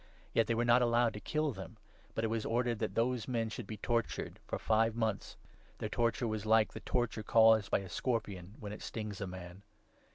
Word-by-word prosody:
Yet 115 -2 +3
they 115 - +1
were 120 +1 +1
not 120 +1 +5
allowed 120 -1 +3
to 105 - -6
kill 155 +5 0
them, 95 0 -9 0.4
but 110 - -1
it - - +2
5 - - -4
was 115 -1 -1
ordered 120 -1 0
that 110 - -2
those 120 -1 +1
men 115 -3 0
should - - -6
be 110 - -6
tortured 115 +2 -2
for - - -2
five 110 0 +2
months. 110 -3 -2 0.4
Their - - -3
torture 115 0 +1
was 110 -2 -2
like 110 0 +4
the - - -6
torture 120 -3 -1
caused 110 -1 +5
by - - +2
a 95 - -8
scorpion 100 -3 -3
when 105 -1 -6
it 105 - -9
stings 105 -3 -5
a 100 - -2
man. 90 0 -9
110 Hz, 220 wpm, -34 LUFS, 105-120 Hz, 0.4 s, not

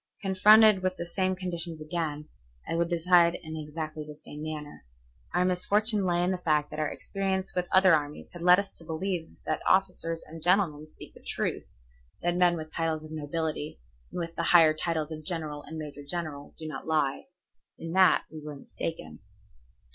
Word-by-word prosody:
Confronted 210 +1 +6
with 185 0 -1
the 170 - -4
same 185 +2 0
conditions 170 -3 -3
again, 155 -2 -3 0.4
I - - -2
would 170 0 +1
decide 170 0 +4
in 160 -1 -7
exactly 155 0 -5
the 150 0 -10
same 150 0 -11
manner. 155 -1 -6 0.5
Our 180 +1 +2
misfortune 205 +3 +2
lay 175 -1 +2
in 180 - +1
the 185 - -2
fact 150 -4 +1
that - - -5
our 155 - +1
experience 195 -1 -3
with 180 -1 -1
other 190 -1 +6
armies 150 -1 -1
had 175 - -9
led 180 +1 +7
us 200 0 -2
to - - -13
believe 165 +1 -3
that - - -1
officers 180 -3 +1
and 165 +1 -10
gentlemen 170 -4 +2
speak - - -13
the - - -15
truth, - - -3 0.6
that 175 0 +1
men 175 -1 +4
with 155 0 -8
titles 160 -2 -1
of 155 - -11
nobility, 155 - -3 0.3
and - - -7
with 170 -1 -5
the - - -1 0.2
higher 160 -2 +6
titles 160 -1 -2
of 155 0 -6
general 155 -3 -3
and 160 - -7
major 150 -2 -7
general, 150 -2 -5
do 155 - -6
not 150 -1 -7
lie. 155 -4 0 0.5
In 165 - -6
that 185 +1 +5
we 155 -1 -8
were 150 -1 -7
mistaken. 110 - -6
165 Hz, 185 wpm, -28 LUFS, 155-180 Hz, 0.6 s, led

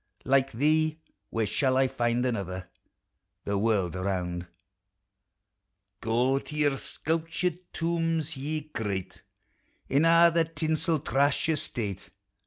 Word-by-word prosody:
Like 135 0 +3
thee 155 +5 +2 0.3
where 115 -1 0
shall 130 +5 +1
I 135 0 +4
find 120 -1 0
another, 95 -6 -3 0.8
The 100 - -1
world 100 -4 +1
around! 90 -2 -2 1.5
Go 125 +4 +2
to 150 - -9
your 145 -2 +2
sculptured 165 +4 -2
tombs, 165 -2 -1
ye 150 +3 -3
great, 105 -11 -4 0.7
In 140 +3 +3
a' 170 +1 +7
the 165 -1 +3
tinsel 160 0 0
trash 140 0 +2
o' - - +4
state! 105 -9 -4
135 Hz, 115 wpm, -28 LUFS, 110-155 Hz, 1.5 s, a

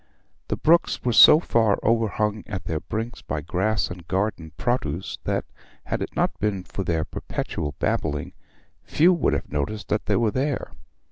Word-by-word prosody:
The - - -2
brooks 170 +2 +3
were 120 - +1
so 150 - +9
far 115 - +2
overhung 110 -2 +1
at 95 -4 -5
their 80 -2 -2
brinks 110 +8 -5
by 75 - -4
grass 95 +6 0
and 85 -2 -9
garden 95 -5 -2
produce 95 - -2
that, - - -1 0.4
had - - -2
it - - -5
not - - 0
been 100 -3 -1
for 95 - -5
their 80 -3 0
perpetual 75 - -4
babbling, 75 -2 -1 0.5
few 175 +4 +3
would 170 - +1
have - - -3
noticed 75 +9 -3
that 105 - -1
they - - +2
were 115 -3 +2
there. 135 +3 -2
105 Hz, 165 wpm, -24 LUFS, 85-115 Hz, 0.5 s, so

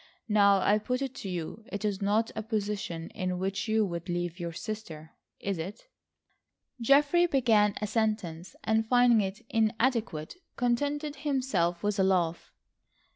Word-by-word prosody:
Now, 200 -2 +5
I 210 +3 +3
put 250 +5 -2
it 265 -2 -4
to 195 - -5
you: 180 +5 -5
it 205 +1 -3
is 205 -2 -1
not 210 +3 +1
a 220 - -2
position 210 -6 -3
in 185 -1 -2
which 195 +4 -2
you 220 0 +3
would 170 -1 -5
leave 175 0 -2
your 170 -1 -3
sister, 165 -5 -7 0.3
is 195 -3 -3
it?" 205 - -7 0.9
Geoffrey 290 +8 +4
began 225 -8 +3
a - - 0
sentence 210 -6 -2
and 220 0 +2
finding 245 -2 +5
it 195 +2 -5
inadequate, 225 - 0 0.2
contented 285 +5 -1
himself 255 - 0
with 205 0 0
a - - +5
laugh. 175 -3 +1
210 Hz, 150 wpm, -29 LUFS, 185-235 Hz, 0.9 s, Now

